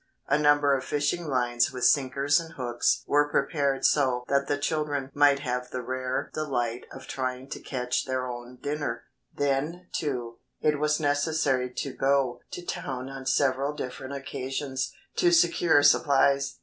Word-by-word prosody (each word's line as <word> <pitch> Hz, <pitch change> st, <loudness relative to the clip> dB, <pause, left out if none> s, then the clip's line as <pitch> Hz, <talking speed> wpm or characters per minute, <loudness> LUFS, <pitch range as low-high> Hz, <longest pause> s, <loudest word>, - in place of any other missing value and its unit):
A 140 Hz, -, +2 dB
number 145 Hz, -1 st, +4 dB
of 130 Hz, -, -3 dB
fishing 150 Hz, +5 st, -1 dB
lines 120 Hz, -3 st, +1 dB
with 125 Hz, -1 st, -2 dB
sinkers 140 Hz, +1 st, +3 dB
and 165 Hz, -1 st, -8 dB
hooks 120 Hz, -2 st, 0 dB
were 145 Hz, 0 st, +3 dB
prepared 140 Hz, -1 st, 0 dB
so 130 Hz, -4 st, +2 dB
that 140 Hz, 0 st, +2 dB
the 145 Hz, -, 0 dB
children 145 Hz, -2 st, -2 dB
might 145 Hz, -1 st, +4 dB
have 125 Hz, -2 st, -3 dB
the 125 Hz, -1 st, -5 dB
rare 130 Hz, +1 st, -3 dB
delight 125 Hz, -6 st, -2 dB
of -, -, -10 dB
trying 130 Hz, 0 st, -4 dB
to -, -, -5 dB
catch 125 Hz, -2 st, -2 dB
their 130 Hz, -1 st, -2 dB
own 120 Hz, 0 st, -7 dB
dinner. 145 Hz, -5 st, -3 dB, 0.3 s
Then, 150 Hz, +6 st, -2 dB
too, 125 Hz, -6 st, -3 dB, 0.2 s
it 150 Hz, -1 st, +1 dB
was 150 Hz, 0 st, +1 dB
necessary 145 Hz, -3 st, +1 dB
to 135 Hz, -, -3 dB
go 135 Hz, -3 st, +1 dB
to 175 Hz, -, -7 dB
town 130 Hz, -4 st, -4 dB
on 135 Hz, -1 st, -8 dB
several 140 Hz, +2 st, +1 dB
different 130 Hz, 0 st, -6 dB
occasions 135 Hz, 0 st, -4 dB, 0.3 s
to 350 Hz, -1 st, +4 dB
secure 175 Hz, -, +4 dB
supplies. 140 Hz, -1 st, +4 dB
140 Hz, 155 wpm, -27 LUFS, 130-145 Hz, 0.3 s, number